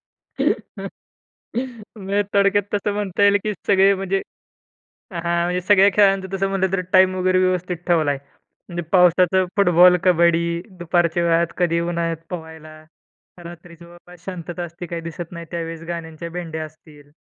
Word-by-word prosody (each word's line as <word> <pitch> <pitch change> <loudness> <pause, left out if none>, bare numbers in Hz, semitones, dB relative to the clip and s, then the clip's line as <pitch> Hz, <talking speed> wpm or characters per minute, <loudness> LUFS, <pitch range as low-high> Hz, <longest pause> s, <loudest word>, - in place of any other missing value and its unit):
म्हणजे 215 -5 -5
थोडक्यात 200 0 +3
तसं 205 0 -1
म्हणता 205 -1 -2
येईल 200 0 +5
की 215 - -1
सगळे 195 0 +5
म्हणजे 195 0 -1 0.9
हां, 170 0 -1
म्हणजे 180 +1 -1
सगळ्या 200 +2 +5
खेळांचं 195 -2 +3
तसं 195 0 0
म्हटलं 190 -1 -1
तर 190 - +1
टाईम 185 -1 +5
वगैरे 185 0 +2
व्यवस्थित 180 -1 0
ठेवलाय. 155 -5 +2 0.5
म्हणजे 175 0 -4
पावसाचं 180 0 +4
फुटबॉल, 180 -2 +6
कबड्डी, 170 -1 +2 0.2
दुपारच्या 175 0 +1
वेळात 170 0 +3
कधी 170 -2 +1
उन्हाळ्यात 170 -1 -2
पोहायला, 160 -3 -9 0.7
रात्रीचं 170 0 -12
बाबा 175 +1 -16
शांतता 175 -1 -6
असते, 175 +1 -8
काही 170 0 -5
दिसत 165 +1 -7
नाही 170 -1 -8
त्यावेळेस 165 -1 -5
गाण्यांच्या 170 -1 -6
भेंडया 165 -2 -5
असतील. 150 -2 -16
175 Hz, 135 wpm, -21 LUFS, 170-190 Hz, 0.9 s, फुटबॉल